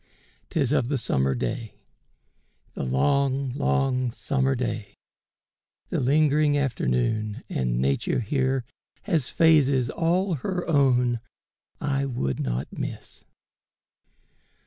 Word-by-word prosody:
'Tis 140 -7 0
of 130 -5 +2
the 140 +1 0
summer 65 - 0
day 65 - -4 0.5
— - - -42
The - - -5
long, 135 - +1
long 135 -2 +1
summer 135 +1 0
day 115 -4 -4 0.5
— - - -52
the - - 0
lingering 145 +2 +3
afternoon, 110 - -1
And 60 -2 -1
Nature 70 - 0
here 130 +2 0 0.4
has 165 -10 0
phases 140 -6 +4
all 175 +3 +1
her 180 +5 -3
own 125 -6 +3 0.6
I 140 -1 0
would 70 - -2
not 60 +1 -3
miss. - - -7
130 Hz, 110 wpm, -25 LUFS, 110-145 Hz, 0.6 s, phases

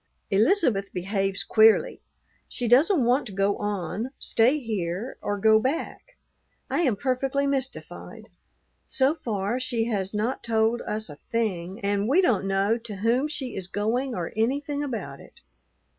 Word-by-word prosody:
Elizabeth 215 - +2
behaves 195 +1 -1
queerly. 225 - +4 0.5
She 245 - -3
doesn't 280 - +5
want 250 +3 +2
to - - -7
go 195 +1 +1
on, 205 +3 -3
stay 240 +6 +2
here, 215 - -4
or 205 - -2
go 220 +2 +5
back. 330 - -4 0.5
I - - +1
am 260 -10 +2
perfectly 270 +4 0
mystified. 270 -2 -4 0.6
So 270 +2 +2
far 225 -5 -2
she 245 -3 -1
has 200 -4 -1
not 220 +5 -2
told 225 +1 +1
us 215 +1 -2
a 145 - -10
thing, 190 -2 -3
and 200 +2 0
we 305 +7 +4
don't 220 - +2
know 195 +4 +1
to 225 -3 -8
whom 235 +8 +1
she 275 -5 -5
is 190 -2 -4
going 235 +6 -1
or 175 -2 -4
anything 285 +6 -1
about 255 -6 -5
it. - - -17
225 Hz, 150 wpm, -25 LUFS, 200-260 Hz, 0.6 s, doesn't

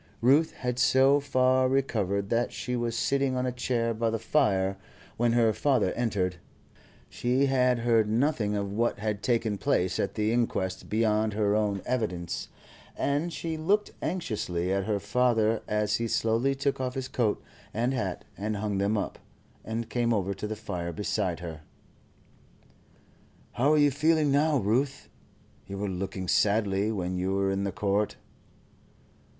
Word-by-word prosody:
Ruth 140 +7 +4
had 125 -1 -3
so 135 +2 +5
far 130 -2 +2
recovered 100 -7 0
that 120 +1 +1
she 125 - -4
was 120 -1 -2
sitting 135 +1 +1
on 125 0 0
a 125 - 0
chair 120 -2 -1
by 115 +1 0
the 115 - -1
fire 100 -6 +1 0.4
when 120 0 +2
her 115 -2 +3
father 125 -10 +1
entered. 100 -7 -1 0.7
She 125 +3 +1
had 125 -2 +3
heard 115 -2 +2
nothing 115 -3 +1
of 100 -1 -2
what 115 +1 0
had 105 -1 -3
taken 115 -4 0
place 95 -10 +1
at 100 - -1
the 110 +1 +1
inquest 105 -6 -1
beyond 110 -1 +1
her 105 -1 +1
own 105 -3 0
evidence, 100 -9 -2 0.5
and 145 +5 0
she 160 -1 -4
looked 200 +7 +1
anxiously 95 - -2
at 95 -1 0
her 105 -2 0
father 110 +1 +2
as 105 0 +1
he 115 - -2
slowly 115 +5 +1
took 140 -1 -1
off 125 -1 -3
his 130 -1 -3
coat 115 -5 0 0.3
and 120 +4 0
hat 100 -8 -3
and 105 +2 -3
hung 100 -1 -2
them 100 +2 +1
up, 100 - -3 0.4
and 115 +1 -4
came 120 -1 +1
over 100 -1 -1
to 105 - -5
the 110 - -4
fire 90 -5 -4
beside 90 -1 -2
her. 80 -3 -7 1.9
"How 135 +5 +2
are - - +4
you 145 -1 +5
feeling 155 +1 +2
now, 145 +2 +3
Ruth? 130 +6 0 0.6
You 100 - -6
were 100 +1 -2
looking 95 0 -4
sadly 100 +1 +2
when 90 -3 -2
you 95 +1 0
were 100 0 +1
in 100 +1 -1
the 100 - -1
court." 105 0 0
110 Hz, 160 wpm, -28 LUFS, 100-130 Hz, 1.9 s, so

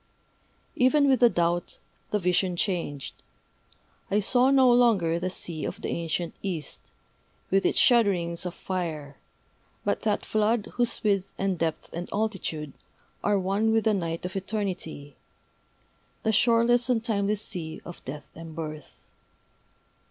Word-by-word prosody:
Even 280 +3 +4
with 265 -2 +4
the 240 - +7
doubt, 175 -2 0 0.3
the 210 - +1
vision 180 -1 +1
changed. 170 -7 -2 1.0
I 205 - +2
saw 250 +5 +4
no 265 -2 +6
longer 210 -9 +3
the 185 +1 -1
sea 170 -4 -3
of - - -4
the - - -4
ancient 170 0 -2
East, 175 -7 -5 0.6
with 195 +1 +3
its - - 0
shudderings 190 -9 +3
of 180 -1 -4
fire, 155 -7 -4 0.7
but - - 0
that 210 -2 0
Flood 215 0 +1
whose 240 -1 0
width 195 -2 +1
and 195 -3 -1
depth 165 -1 -2
and 175 +1 -5
altitude 195 -9 -2 0.5
are 205 0 +3
one 195 +4 +1
with 225 0 +3
the 220 - +3
Night 170 -3 -2
of 185 +2 -5
Eternity, 185 -7 -4 1.1
the 220 - +2
shoreless 235 +2 +3
and 230 -3 +2
timeless 210 -2 0
Sea 165 -6 -3
of 175 - -10
Death 145 +3 -8
and 165 -1 -10
Birth. 155 -3 -8
195 Hz, 140 wpm, -27 LUFS, 170-220 Hz, 1.1 s, the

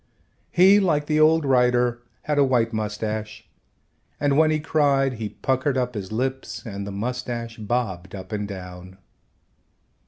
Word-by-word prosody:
He, 190 +3 +6
like 155 -7 +1
the 155 0 +1
old 160 0 +4
writer, 125 -2 +2 0.2
had 150 -1 0
a - - +6
white 120 -4 +1
mustache, 105 0 -4 0.7
and 145 -1 +2
when 155 +1 +5
he 155 0 +1
cried 140 -3 +2
he 105 - -2
puckered 130 +3 -1
up 125 -1 -1
his 100 -3 -6
lips 130 +4 -3
and 100 -2 -6
the - - -5
mustache 120 +2 -4
bobbed 100 -5 -3
up 95 -1 -9
and 105 -1 -3
down. 90 -1 -9
125 Hz, 150 wpm, -23 LUFS, 105-140 Hz, 0.7 s, He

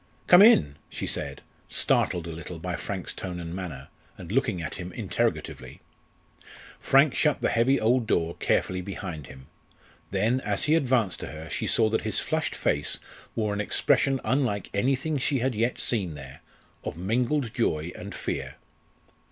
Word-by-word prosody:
"Come 180 +1 +8
in," 75 - +6
she - - -4
said, - - -2 0.3
startled 85 -2 +1
a 85 - -5
little 85 +2 -7
by 90 +2 -3
Frank's 95 0 -5
tone 90 -2 -5
and 85 -1 -6
manner, 80 -8 -6 0.3
and 90 -1 -9
looking 120 -7 +1
at 80 -3 -4
him 90 0 -6
interrogatively. - - -2 1.0
Frank 135 +1 +4
shut 150 -3 +2
the - - +1
heavy 125 +4 +3
old 115 +1 +2
door 85 -5 +1
carefully 90 0 +1
behind 90 -6 -6
him. 65 -1 -12 0.6
Then, 110 +7 +1
as 105 -1 0
he 150 0 +3
advanced 125 - +2
to - - -5
her 80 +1 -8
she - - -2
saw 110 - +4
that 110 - 0
his - - -2
flushed - - -1
face 75 0 +1 0.4
wore 105 -2 0
an 105 - -1
expression 135 +5 +2
unlike 125 -8 0
anything 135 +7 +1
she 135 +2 +1
had 130 +1 0
yet 115 +3 0
seen 95 -9 -1
there 70 -2 -10 0.4
of - - -5
mingled 120 - 0
joy 85 -9 0
and - - -8
fear. - - -4
100 Hz, 165 wpm, -27 LUFS, 85-125 Hz, 1.0 s, Come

